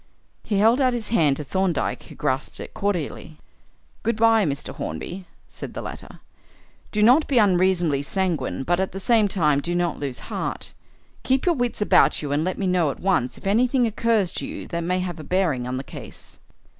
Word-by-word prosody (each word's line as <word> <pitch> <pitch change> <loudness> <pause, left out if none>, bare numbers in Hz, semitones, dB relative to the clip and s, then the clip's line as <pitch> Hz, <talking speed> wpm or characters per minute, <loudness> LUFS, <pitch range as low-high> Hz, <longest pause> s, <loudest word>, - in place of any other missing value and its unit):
He 205 - -1
held 225 +6 +4
out 255 -1 +3
his 235 -3 -4
hand 150 -11 +3
to 150 - -4
Thorndyke, 180 +1 -1
who - - -12
grasped 130 +2 -2
it - - -8
cordially. 170 -5 -3 0.6
"Good 230 - 0
bye, 225 -1 +4
Mr. 140 -2 -3
Hornby," 175 - -6 0.2
said - - -9
the - - -4
latter. - - -9 0.7
"Do 210 -1 +1
not 255 +8 +5
be 270 - +1
unreasonably 180 -7 +3
sanguine, 160 -4 -2
but 175 +4 +1
at 190 - -1
the 195 - -5
same 220 +1 +3
time, 150 -7 +2
do 175 +4 -2
not 175 -2 0
lose 135 -3 -4 0.2
heart. - - -4 0.5
Keep 265 0 +1
your 350 - +4
wits 245 -6 -1
about - - +4
you 145 - -3
and 145 +2 +1
let 185 +2 -2
me 200 - -2
know 180 -4 +2
at - - -5
once 180 -10 0
if - - -15
anything 245 +5 +3
occurs 225 -4 +1
to - - -5
you - - -7
that 170 -1 -2
may 180 +2 0
have 175 -3 -4
a - - -7
bearing 160 -9 0
on 125 0 -3
the 130 - -4
case." - - -11
185 Hz, 200 wpm, -23 LUFS, 155-220 Hz, 0.7 s, not